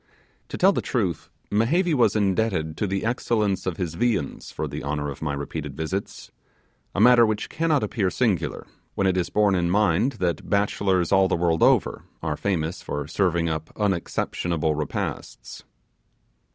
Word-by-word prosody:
To - - -5
tell 190 +2 +5
the - - -1
truth, 95 - -2 0.2
Mehevi 155 - +2
was 125 -6 +3
indebted 95 -6 0
to 105 - -1
the 95 +2 -2
excellence 110 -5 0
of 90 - -2
his 85 -4 -3
viands 110 +2 -1
for - - -4
the - - -6
honour 75 0 -2
of 70 - -10
my 75 -2 -2
repeated 70 0 -5
visits 95 +5 -4 0.6
a - - 0
matter 120 +2 +7
which 110 -1 0
cannot 155 -5 +1
appear 105 -2 0
singular, 95 -7 -1 0.3
when 100 - 0
it 95 -1 +2
is 90 -2 0
borne 105 -1 +3
in 85 -2 +1
mind 105 +5 +2
that 90 -8 -2
bachelors, 100 -3 +1
all 95 -1 +5
the - - +1
world 85 -1 +1
over, - - +3 0.2
are 80 -2 -1
famous 85 -4 -2
for 75 0 -4
serving 85 -1 +1
up 80 -1 -3
unexceptionable 85 -4 -1
repasts. 75 0 -5
95 Hz, 165 wpm, -24 LUFS, 80-105 Hz, 0.6 s, matter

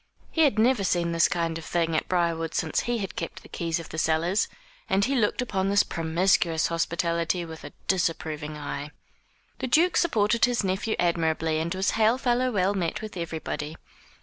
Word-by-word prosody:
He 325 - +1
had 265 -7 +2
never 230 -1 +3
seen 170 -2 +1
this 165 -1 +4
kind 165 -2 -1
of - - -10
thing 165 0 0
at - - 0
Briarwood 170 -2 0
since 160 - 0
he 240 0 -1
had 195 -4 -5
kept 165 - -5
the - - -13
keys 170 0 -2
of 165 - -9
the 160 - -4
cellars; 165 +6 +1 0.4
and 195 +1 +3
he 270 - 0
looked 235 +1 +1
upon 195 -5 -1
this 200 0 +4
promiscuous 165 0 +1
hospitality 170 +1 0
with 160 -1 -10
a - - -8 0.2
disapproving 155 -4 -1
eye. 145 0 -5 0.7
The - - -2
Duke 330 +8 +3
supported 230 -8 +3
his 245 -3 0
nephew 190 +3 -1
admirably, 160 -2 +1
and 165 +1 -2
was 190 +1 +1
hail 225 +2 +3
fellow 255 0 +1
well 200 -3 +1
met 195 +3 -2
with 215 - -7
everybody. 160 -2 -4
175 Hz, 185 wpm, -26 LUFS, 165-210 Hz, 0.7 s, this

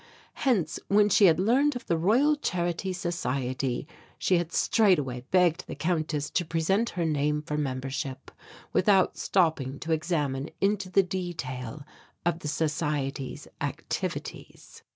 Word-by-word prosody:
Hence 195 - 0
when 210 +1 +4
she 200 +1 +6
had 165 -2 +5
learned 260 +8 +3
of 245 - -6
the 170 - +1
Royal 235 - +3
Charity 175 - -2
Society 135 -7 -2 0.3
she 180 -2 +2
had 170 -1 -4
straightway 150 - +2
begged 180 -3 +3
the - - -6
Countess 155 -3 -1
to 175 - +1
present 175 +7 +1
her 170 - +1
name 150 -1 0
for 150 -1 -3
membership, 135 -1 -3 0.4
without 190 -1 +4
stopping 155 -7 +1
to 165 - -4
examine 150 -4 -1
into 195 -1 +1
the 195 +1 +4
detail 150 -8 -5 0.4
of 175 -1 +1
the 150 - -6
Society's 145 -4 -2
activities. - - -5
165 Hz, 130 wpm, -28 LUFS, 145-185 Hz, 0.4 s, she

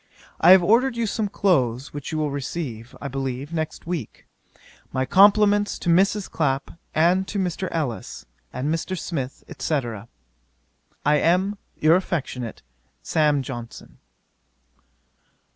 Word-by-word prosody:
I 170 - +5
have 185 -1 +9
ordered 235 +6 +3
you 235 - +1
some 210 0 -1
clothes, 135 - +1
which 145 -1 -6
you 160 - -2
will 150 -2 -1
receive, 130 -4 -5
I 140 - -5
believe, 135 +2 -4
next 160 -2 -4
week. 165 -9 -5 0.7
My 130 0 0
compliments 205 +4 +5
to 175 - -3
Mrs. 195 +3 +3
Clapp 135 -3 -1 0.2
and 180 +4 +3
to 205 - -4
Mr. 185 0 -1
Ellis, 145 -9 -4 0.3
and 145 +5 -2
Mr. 175 +3 -3
Smith, 140 -6 -4 0.2
&c. 155 - 0 1.3
'I 150 - +4
am 185 +6 +1 0.2
'Your 155 +2 +5
affectionate, 135 - -3 0.4
'SAM. 150 -3 +2
JOHNSON.' 120 -2 -9
160 Hz, 125 wpm, -23 LUFS, 135-190 Hz, 1.3 s, have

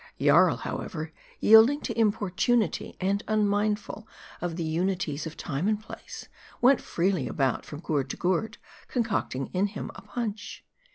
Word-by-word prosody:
Jarl, - - +5
however, 160 -1 -5 0.3
yielding 225 +7 +7
to 230 - -4
importunity, 215 0 +1
and 195 +2 0
unmindful 210 0 0 0.3
of 175 -2 -2
the 170 - -3
unities 165 -2 -1
of 160 - -9
time 155 +4 -2
and 215 -1 +1
place, 215 - -10 0.3
went 260 +2 +5
freely 175 -5 0
about, 135 -4 -1
from 150 +1 -8
gourd 145 -6 -1
to - - -4
gourd, 185 +5 0 0.3
concocting 215 - -2
in 190 +2 +2
him 205 0 -6
a - - -11
punch. 210 +1 -5
200 Hz, 145 wpm, -27 LUFS, 165-215 Hz, 0.3 s, yielding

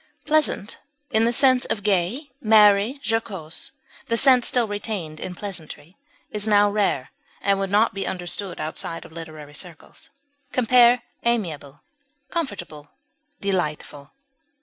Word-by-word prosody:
Pleasant, 300 -9 +1 0.3
in 220 +1 +4
the 235 - +3
sense 255 +1 +4
of 205 - -2
gay, 210 - 0
merry, 215 +3 +5
jocose 205 -8 -2 0.4
(the 230 - +1
sense 255 -1 +5
still 245 -3 +1
retained 205 -7 -4
in 180 - -6
pleasantry), 175 -4 -7 0.4
is 210 0 -2
now 205 -1 +5
rare, 200 -11 0 0.3
and 200 -1 +1
would 195 -1 -1
not 210 +3 +3
be 195 0 -3
understood 180 +1 -4
outside 160 +1 -4
of 165 - -13
literary 155 -3 -9
circles. 170 0 -9 0.4
Compare 245 0 +5 0.2
AMIABLE; 160 - -2 0.5
COMFORTABLE; 175 - -5 0.5
DELIGHTFUL. 150 -7 -3
200 Hz, 125 wpm, -23 LUFS, 165-230 Hz, 0.5 s, merry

